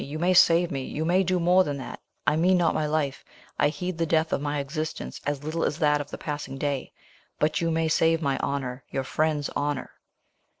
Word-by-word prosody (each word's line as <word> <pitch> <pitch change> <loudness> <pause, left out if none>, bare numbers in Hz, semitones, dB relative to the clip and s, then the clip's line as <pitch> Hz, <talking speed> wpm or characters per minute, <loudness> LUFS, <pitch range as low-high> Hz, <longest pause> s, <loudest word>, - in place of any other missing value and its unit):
you 145 +3 -6
may 175 +3 +2
save 175 -1 +5
me 135 - -2
you 155 +4 -3
may 180 +3 +3
do 185 -1 +1
more 180 +2 +5
than 145 -4 -3
that 130 - -7 0.3
I - - +3
mean 180 +4 +4
not 170 -2 +2
my 155 - 0
life, 150 -3 -1 0.4
I - - +4
heed 180 +2 -4
the 165 - +1
death 160 0 +1
of - - 0
my 145 0 -1
existence 140 - -4
as 145 -1 -2
little 160 +2 -2
as 150 - 0
that 150 -3 +2
of 145 - -8
the - - -6
passing 145 -2 -5
day; 140 -1 -2 0.5
but 155 +2 +1
you 165 - +1
may 165 0 +1
save 165 +1 +3
my 140 -4 0
honour, 135 -2 -3
your 135 - -2
friend's 150 +1 0
honour." 145 -2 -2
155 Hz, 220 wpm, -26 LUFS, 140-165 Hz, 0.5 s, save